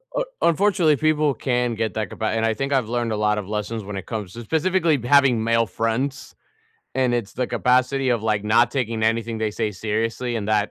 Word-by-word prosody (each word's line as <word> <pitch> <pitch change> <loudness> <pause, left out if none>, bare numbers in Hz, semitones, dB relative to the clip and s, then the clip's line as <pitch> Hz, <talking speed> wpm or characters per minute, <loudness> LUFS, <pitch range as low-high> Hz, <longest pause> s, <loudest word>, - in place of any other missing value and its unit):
U - - 0 0.2
unfortunately, 170 -3 +3
people 155 0 +2
can 125 -3 -1
get 110 0 -2
that 110 -4 -2
ca - - -9
ba 110 - -2
and 115 +1 0
I 110 - +2
think 140 +4 -2
I've 125 -5 +1
learned 120 -1 -1
a 110 - -1
lot 105 0 +1
of 100 - -4
lessons 105 +1 -3
when 100 0 -7
it 95 - -6
comes 105 -5 -5
to 120 - -8
specifically 160 - +1
having 130 -4 +4
male 115 0 +2
friends. 115 +6 -3 0.6
And 130 -2 +2
it's 115 -4 -3
the 125 - -1
capacity 130 +2 +1
of, 120 -3 +1
like, 105 -2 +1
not 115 +3 +3
taking 115 -5 -1
anything 115 0 0
they 110 -1 -1
say 110 -1 -1
seriously, 115 +5 -2
and 105 -2 -3
that 105 -1 +1
115 Hz, 220 wpm, -22 LUFS, 110-135 Hz, 0.6 s, having